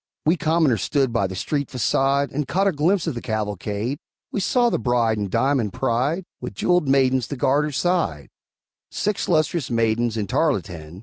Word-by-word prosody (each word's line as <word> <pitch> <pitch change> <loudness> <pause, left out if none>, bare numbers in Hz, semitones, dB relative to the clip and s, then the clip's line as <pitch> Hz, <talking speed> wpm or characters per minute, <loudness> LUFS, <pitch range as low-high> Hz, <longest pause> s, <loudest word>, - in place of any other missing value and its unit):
We 160 +3 +4
commoners 160 - +1
stood 135 -5 0
by 100 -5 +1
the 95 - -7
street 140 +8 -2
façade, 135 +4 +1
And 145 0 -2
caught 195 +7 +1
a 195 - +3
glimpse 170 +4 +1
of 165 - -1
the 120 - -6
cavalcade. 105 - -3 0.3
We - - -2
saw 240 +4 +2
the - - 0
bride 115 -2 +1
In 100 -1 -2
diamond 130 -4 +1
pride, 135 +10 0 0.2
With 125 -5 -7
jeweled 180 - +1
maidens 130 -2 +2
to 140 - -5
guard 140 +4 +2
her 150 - -3
side 160 - -1 0.6
Six 210 -1 -2
lustrous 155 -3 +1
maidens 115 0 +1
in 105 - -1
tarletan. 90 - -2
130 Hz, 180 wpm, -22 LUFS, 110-155 Hz, 0.6 s, We